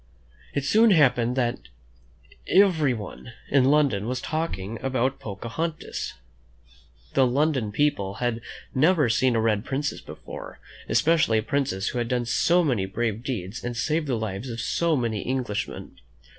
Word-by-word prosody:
It 140 Hz, -1 st, -1 dB
soon 220 Hz, +9 st, +5 dB
happened 125 Hz, -, +4 dB
that 120 Hz, -2 st, 0 dB, 0.9 s
everyone 140 Hz, -, +2 dB, 0.2 s
in 135 Hz, -2 st, +5 dB
London 135 Hz, -8 st, +3 dB
was 125 Hz, +1 st, -2 dB
talking 115 Hz, -, -3 dB
about 130 Hz, 0 st, 0 dB
Pocahontas. 115 Hz, +11 st, -4 dB, 1.0 s
The 135 Hz, -1 st, +4 dB
London 130 Hz, -4 st, +1 dB
people 100 Hz, -7 st, 0 dB
had 120 Hz, +1 st, -2 dB, 0.3 s
never 150 Hz, -1 st, +3 dB
seen 120 Hz, +2 st, +2 dB
a -, -, +2 dB
red 110 Hz, -2 st, +1 dB
princess 140 Hz, +3 st, -2 dB
before, -, -, -10 dB, 0.3 s
especially 155 Hz, -8 st, +3 dB
a 110 Hz, -, 0 dB
princess 130 Hz, -8 st, -1 dB
who 125 Hz, -, -3 dB
had 120 Hz, -, -1 dB
done 125 Hz, 0 st, 0 dB
so 175 Hz, +9 st, +3 dB
many 120 Hz, -, 0 dB
brave 110 Hz, +2 st, -2 dB
deeds, 115 Hz, -6 st, -4 dB
and 120 Hz, -1 st, -4 dB
saved 155 Hz, +4 st, 0 dB
the 125 Hz, -4 st, 0 dB
lives 110 Hz, +2 st, -4 dB
of 115 Hz, -1 st, -5 dB
so 165 Hz, +6 st, +1 dB
many 115 Hz, -6 st, -1 dB
Englishmen. 125 Hz, -5 st, -3 dB
125 Hz, 145 wpm, -25 LUFS, 110-145 Hz, 1.0 s, soon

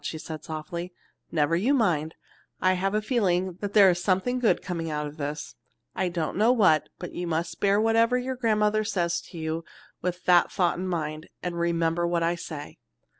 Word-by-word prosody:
she 160 Hz, -, -4 dB
said 155 Hz, -1 st, -7 dB
softly. 170 Hz, +3 st, -5 dB, 0.4 s
"Never 155 Hz, 0 st, +2 dB
you 235 Hz, +12 st, +2 dB
mind! 165 Hz, -, +1 dB, 0.4 s
I 185 Hz, 0 st, +3 dB
have 195 Hz, +2 st, 0 dB
a 215 Hz, -, 0 dB
feeling 190 Hz, -6 st, +1 dB
that 205 Hz, -1 st, -4 dB
there 205 Hz, -2 st, +8 dB
is 175 Hz, 0 st, -3 dB
something 205 Hz, +7 st, +1 dB
good 240 Hz, -, +3 dB
coming 165 Hz, -3 st, -3 dB
out 150 Hz, -1 st, -2 dB
of 150 Hz, +1 st, -8 dB
this. 150 Hz, +1 st, -4 dB, 0.4 s
I 185 Hz, -1 st, 0 dB
don't 170 Hz, -2 st, -3 dB
know 220 Hz, +4 st, +5 dB
what, 185 Hz, -11 st, +4 dB
but 180 Hz, -, -7 dB
you 175 Hz, -, -4 dB
must 165 Hz, +1 st, -2 dB
bear 200 Hz, 0 st, +3 dB
whatever 230 Hz, +2 st, +3 dB
your 255 Hz, +1 st, -3 dB
grandmother 215 Hz, -3 st, +2 dB
says 175 Hz, -4 st, 0 dB
to 175 Hz, -, -10 dB
you 160 Hz, +1 st, -3 dB, 0.4 s
with 180 Hz, 0 st, -3 dB
that 175 Hz, -1 st, +5 dB
thought 175 Hz, -2 st, +1 dB
in 185 Hz, -, -3 dB
mind, 155 Hz, -3 st, -3 dB
and 175 Hz, -1 st, -3 dB
remember 170 Hz, 0 st, +1 dB
what 170 Hz, -1 st, 0 dB
I 170 Hz, +1 st, +2 dB
say." 160 Hz, -4 st, -8 dB
175 Hz, 195 wpm, -26 LUFS, 165-205 Hz, 0.4 s, there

